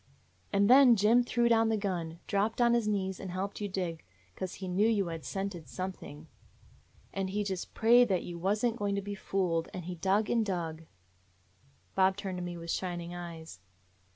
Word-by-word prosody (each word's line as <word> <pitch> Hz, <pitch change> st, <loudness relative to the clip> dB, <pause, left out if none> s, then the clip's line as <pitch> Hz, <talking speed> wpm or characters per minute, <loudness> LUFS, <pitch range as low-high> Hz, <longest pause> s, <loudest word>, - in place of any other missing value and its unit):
"And 200 Hz, 0 st, +3 dB
then 255 Hz, 0 st, +8 dB
Jim 225 Hz, +4 st, +4 dB
threw 240 Hz, 0 st, +1 dB
down 225 Hz, -1 st, +4 dB
the 220 Hz, -, +1 dB
gun, 175 Hz, -5 st, -3 dB
dropped 205 Hz, +3 st, 0 dB
on 235 Hz, -1 st, +4 dB
his 235 Hz, -3 st, +1 dB
knees, 190 Hz, -3 st, -1 dB
and 190 Hz, -, -6 dB
helped 190 Hz, +4 st, -4 dB
you 205 Hz, -, -2 dB
dig; 180 Hz, -4 st, -3 dB, 0.3 s
'cause 185 Hz, -1 st, -5 dB
he 190 Hz, -, -6 dB
knew 190 Hz, +4 st, +2 dB
you 210 Hz, -4 st, +2 dB
had 165 Hz, -2 st, -6 dB
scented 195 Hz, -5 st, -4 dB
something. 185 Hz, -5 st, -6 dB, 0.9 s
And 195 Hz, -1 st, -2 dB
he 205 Hz, +2 st, -1 dB
just 190 Hz, -3 st, -5 dB
prayed 240 Hz, +2 st, +6 dB
that 190 Hz, -4 st, 0 dB
you 170 Hz, -1 st, -7 dB
was 205 Hz, +6 st, +1 dB
n't 235 Hz, -1 st, 0 dB
going 205 Hz, -2 st, -1 dB
to 200 Hz, -, -1 dB
be 205 Hz, +1 st, -5 dB
fooled, 180 Hz, -4 st, -1 dB
and 180 Hz, -2 st, -6 dB
he 180 Hz, -, -4 dB
dug 195 Hz, +5 st, +1 dB
and 230 Hz, -2 st, +2 dB
dug 165 Hz, -5 st, -3 dB, 0.4 s
— 95 Hz, 0 st, -37 dB
" 135 Hz, +1 st, -34 dB
Bob 190 Hz, 0 st, +3 dB
turned 190 Hz, -3 st, -4 dB
to -, -, -4 dB
me 175 Hz, -1 st, -5 dB
with 170 Hz, 0 st, -5 dB
shining 175 Hz, -2 st, -3 dB
eyes. 165 Hz, -, -8 dB
190 Hz, 205 wpm, -31 LUFS, 175-210 Hz, 0.9 s, then